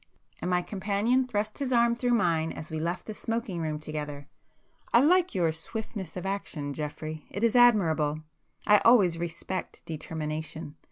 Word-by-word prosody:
—and 180 - -2
my 180 0 +2
companion 210 +7 +1
thrust 215 -1 -2
his 270 -2 -2
arm 235 -1 +4
through 245 +1 -1
mine 165 -6 +1
as 160 +2 -8
we 160 - -2
left 170 +3 -2
the 215 - -5
smoking 225 -6 -3
room 155 -1 -2
together—"I 150 +7 -4
like 355 - +4
your 170 -3 +2
swiftness 190 +1 -5
of 180 - -5
action 165 -7 -3
Geoffrey. 155 +1 -5
It 200 - -4
is 230 +1 +3
admirable! 165 -11 +4 0.4
I 210 -1 +6
always 195 -8 +5
respect 170 +2 -5
determination. 155 -1 -5
180 Hz, 155 wpm, -28 LUFS, 155-225 Hz, 0.4 s, I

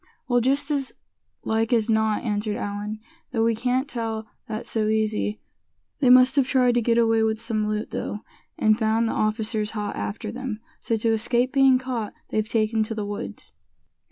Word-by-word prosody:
"Well, 245 -1 +3
just 280 +4 +1
as 275 -3 -1 0.5
like 220 +1 0
as 230 -3 +3
not," 220 -1 +1
answered 210 -2 -1
Allan; 205 +1 -4 0.3
"though 225 -3 0
we 230 0 +3
can't 250 +4 0
tell 225 -3 -3 0.2
that 215 +2 -4
so 215 -2 -1
easy. 215 -1 0 0.6
They 265 -4 +4
must 255 +1 +7
have 270 -2 +4
tried 250 -2 +3
to 240 - +2
get 230 0 +2
away 225 -1 +3
with 220 0 +1
some 225 -2 -1
loot, 215 +1 -2
though, 210 - -4 0.4
and 215 +1 +3
found 225 +1 +2
the - - -1
officers 215 0 -1
hot 210 -1 -3
after 210 +1 -4
them. 245 -3 -5 0.2
So, 230 - -1
to 225 +1 +1
escape 240 +3 +1
being 270 -2 +6
caught 255 -4 -4
they've 215 0 -1
taken 220 -1 +1
to 225 - -5
the 210 -1 -3
woods." 205 0 -7
225 Hz, 185 wpm, -24 LUFS, 215-245 Hz, 0.6 s, must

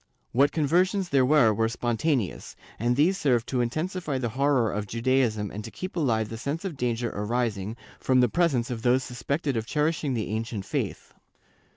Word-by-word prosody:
What 140 +4 +4
conversions 180 +5 +1
there 135 -2 +3
were 135 -7 +5
were 110 +2 +1
spontaneous, 120 - -1 0.2
and 120 +3 +1
these 175 +8 +3
served 120 -5 +2
to 125 -2 +1
intensify 155 +4 -2
the 125 -2 -2
horror 135 -4 +2
of 105 0 -3
Judaism 115 -3 +1
and 105 +2 -6
to 115 - -7
keep 185 +10 -7
alive 115 - +1
the 115 - -6
sense 145 - -3
of 180 -5 -3
danger 120 -2 -1
arising 110 -1 -2 0.2
from 130 -1 +3
the 125 - +5
presence 130 -4 +1
of 115 -2 -4
those 125 +2 +3
suspected 140 +3 -2
of 110 0 -2
cherishing 150 -2 0
the 110 - -2
ancient 110 -2 -3
faith. - - -4
125 Hz, 180 wpm, -26 LUFS, 115-145 Hz, 0.2 s, were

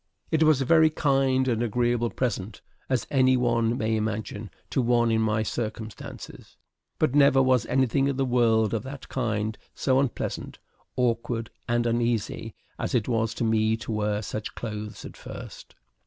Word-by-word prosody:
It 160 -1 +2
was 155 -3 +5
a - - 0
very 160 +2 +5
kind 135 -3 +2
and 115 -3 +1
agreeable 120 0 +1
present, 110 -5 -3 0.3
as 130 -4 0
any 130 -2 +4
one 120 -1 +1
may 110 -1 0
imagine, 110 -1 -3 0.2
to 130 - +2
one 120 -1 +2
in 110 0 +2
my 110 0 +1
circumstances, 110 -1 -6 0.4
but 125 - +1
never 140 -2 +5
was 130 -3 +3
anything 130 +1 +2
in 140 -2 -1
the 135 - +1
world 115 -4 +2
of 115 - 0
that 135 0 -9
kind 110 -4 -1 0.2
so 130 -1 +2
unpleasant, 135 -3 -3 0.4
awkward, 115 -2 -1 0.2
and 120 0 +1
uneasy 115 -2 -1 0.2
as - - -2
it 115 -4 +1
was 115 -2 0
to - - -2
me 110 0 +2
to 115 - -6
wear 105 0 -1
such 110 +1 -5
clothes 105 -2 -6
at - - -9
first. - - -10
120 Hz, 165 wpm, -26 LUFS, 110-130 Hz, 0.4 s, was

